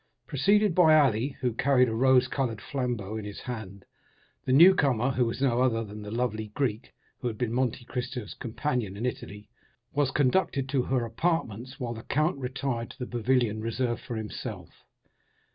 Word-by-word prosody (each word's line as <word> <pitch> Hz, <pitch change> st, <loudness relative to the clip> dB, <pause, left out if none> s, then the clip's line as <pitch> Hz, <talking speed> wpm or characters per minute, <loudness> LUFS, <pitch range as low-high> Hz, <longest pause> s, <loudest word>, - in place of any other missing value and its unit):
Preceded 200 Hz, +7 st, +3 dB
by 160 Hz, -3 st, +6 dB
Ali, 135 Hz, -1 st, +2 dB
who 125 Hz, -3 st, 0 dB
carried 130 Hz, +1 st, +3 dB
a 110 Hz, -, -2 dB
rose 130 Hz, +2 st, +4 dB
colored 125 Hz, -5 st, -2 dB
flambeau 120 Hz, -4 st, -3 dB
in 110 Hz, -, -5 dB
his 105 Hz, -1 st, -7 dB
hand, 105 Hz, -6 st, -7 dB, 0.6 s
the -, -, 0 dB
young 170 Hz, +8 st, +8 dB, 0.2 s
lady, 125 Hz, +4 st, 0 dB
who 125 Hz, -, +3 dB
was 115 Hz, +4 st, -3 dB
no 125 Hz, -2 st, +2 dB
other 115 Hz, -3 st, +2 dB
than 105 Hz, 0 st, -9 dB
the 105 Hz, -, -7 dB
lovely 110 Hz, -1 st, -2 dB
Greek 125 Hz, -5 st, -2 dB, 0.3 s
who 125 Hz, -, -3 dB
had 110 Hz, -3 st, -4 dB
been 120 Hz, -1 st, -1 dB
Monte 125 Hz, -1 st, -1 dB
Cristo's 125 Hz, -4 st, -5 dB
companion 120 Hz, -4 st, -3 dB
in 115 Hz, -, -3 dB
Italy, 105 Hz, -4 st, -5 dB, 0.5 s
was 145 Hz, -2 st, +2 dB
conducted 135 Hz, 0 st, +1 dB
to 135 Hz, -1 st, +2 dB
her 125 Hz, -1 st, 0 dB
apartments, 125 Hz, -, -2 dB
while 120 Hz, -2 st, -3 dB
the 115 Hz, -, -8 dB
count 155 Hz, +8 st, 0 dB
retired 130 Hz, -2 st, -3 dB
to -, -, -12 dB
the 125 Hz, -, -4 dB
pavilion 120 Hz, -2 st, 0 dB
reserved 120 Hz, +1 st, -2 dB
for 125 Hz, -2 st, -6 dB
himself. 110 Hz, -1 st, -6 dB
125 Hz, 180 wpm, -28 LUFS, 115-135 Hz, 0.6 s, young